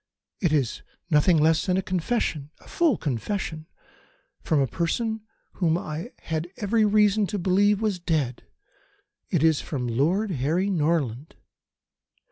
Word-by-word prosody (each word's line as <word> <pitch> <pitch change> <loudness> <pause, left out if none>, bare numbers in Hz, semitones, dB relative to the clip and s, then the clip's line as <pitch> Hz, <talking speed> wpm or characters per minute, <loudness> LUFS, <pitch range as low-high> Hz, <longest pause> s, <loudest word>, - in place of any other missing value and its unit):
It 175 -6 +1
is 140 -7 0 0.3
nothing 160 +3 +4
less 160 +4 +3
than 185 0 +2
a 190 - 0
confession 175 -6 -1
a - - -20
full 320 - +2
confession 155 - -3 0.7
from 155 - +1
a 135 - +3
person 220 - -2 0.4
whom 165 -3 +2
I 165 +7 -5
had 160 +1 -3
every 215 +2 +1
reason 210 0 +3
to 210 - -3
believe 200 +3 +2
was 205 -4 0
dead. 150 -8 -1 0.9
It 165 -5 +1
is 160 -2 +3
from 130 -5 -4
Lord 170 - +1
Harry 170 +7 0
Norland." 150 - -1
170 Hz, 135 wpm, -25 LUFS, 150-200 Hz, 0.9 s, nothing